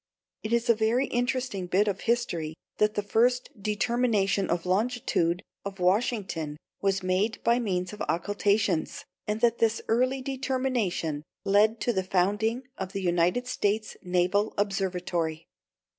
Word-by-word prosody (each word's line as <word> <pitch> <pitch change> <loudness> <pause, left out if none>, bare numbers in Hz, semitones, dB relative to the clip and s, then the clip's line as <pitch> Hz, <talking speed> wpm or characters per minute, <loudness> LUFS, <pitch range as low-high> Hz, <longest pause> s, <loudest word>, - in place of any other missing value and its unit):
It 215 - -5
is 235 +1 +2
a 235 - +6
very 225 +4 +2
interesting 245 -6 -1
bit 195 +4 +2
of 195 -2 -1
history 175 -10 -1 0.2
that 210 0 +3
the 205 - 0
first 245 +5 +2
determination 210 -2 +1
of 170 0 0
the 180 - -5
longitude 190 -5 +1 0.2
of 200 -1 -6
Washington 180 -6 0 0.2
was 195 -1 +1
made 185 +4 0
by 235 +1 +3
means 185 -4 -2
of 210 - -9
occultations, 200 0 0 0.2
and 210 +1 -1
that 235 -1 +3
this 225 0 +2
early 255 +3 +1
determination 255 - -1 0.2
led 215 +3 +4
to 240 - +1
the 190 - +1
founding 205 +7 +1 0.2
of 190 -1 -4
the 195 - -2
United 175 +7 +2
States 215 -3 -1
Naval 185 +4 +1
Observatory. 180 -5 -1
205 Hz, 145 wpm, -27 LUFS, 185-235 Hz, 0.2 s, a